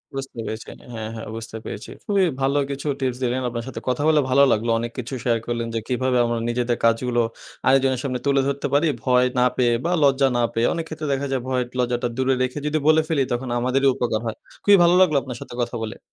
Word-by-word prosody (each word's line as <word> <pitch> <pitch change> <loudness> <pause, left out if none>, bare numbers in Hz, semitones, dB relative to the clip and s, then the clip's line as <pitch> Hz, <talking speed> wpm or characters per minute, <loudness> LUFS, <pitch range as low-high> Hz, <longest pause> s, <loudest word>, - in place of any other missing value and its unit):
বুঝতে 135 -3 -6
পেরেছি। 110 0 -6 0.2
হ্যাঁ, 110 -1 -5
হ্যাঁ। 110 - -6
বুঝতে 115 0 -7
পেরেছি। 105 - -7 0.2
খুবই 200 -2 +2 0.2
ভালো 135 +2 +2
কিছু 140 +1 -4
টিপস 130 -2 -1
দিলেন। 125 +1 0
আপনার 115 -1 -4
সাথে 130 - -6
কথা 125 +3 0
বলে 155 -1 +5
ভালো 140 +2 +5
লাগলো। 115 +2 +1
অনেক 120 0 -4
কিছু 125 +2 -6
শেয়ার 120 -2 +2
করলেন, 120 -1 -2
যে, - - +1
কিভাবে 130 0 +1
আমরা 120 0 -1
নিজেদের 120 0 0
কাজগুলো 120 +1 +2 0.5
আরেকজনের 130 -1 +3
সামনে 130 -3 -2
তুলে 140 -1 +3
ধরতে 140 0 -1
পারি, 145 +4 +4 0.2
ভয় 125 -1 +4
না 125 - +5
পেয়ে 120 -2 +3
বা 175 - +1
লজ্জা 135 -1 +4
না - - +2
পেয়ে। 115 +1 +2
অনেক 165 -1 -3
ক্ষেত্রে 155 -1 -5
দেখা 140 +1 -2
যায় 135 -2 0
ভয় 130 -1 0
একটু 125 - -19
লজ্জাটা 120 0 0
দূরে 130 0 +2
রেখে 130 +2 -3
যদি 150 +1 +1
বলে 155 0 +6
ফেলি, 155 -4 +1
তখন 125 +1 -3
আমাদেরই 130 +3 +2
উপকার 115 -3 -1
হয়। 110 - -3 0.3
খুবই 205 -1 +7
ভালো 170 +1 +5
লাগলো 160 -6 +4
আপনার 125 -3 -7
সাথে - - -9
কথা 120 +1 -5
বলে। 110 0 -6
130 Hz, 225 wpm, -23 LUFS, 120-140 Hz, 0.5 s, খুবই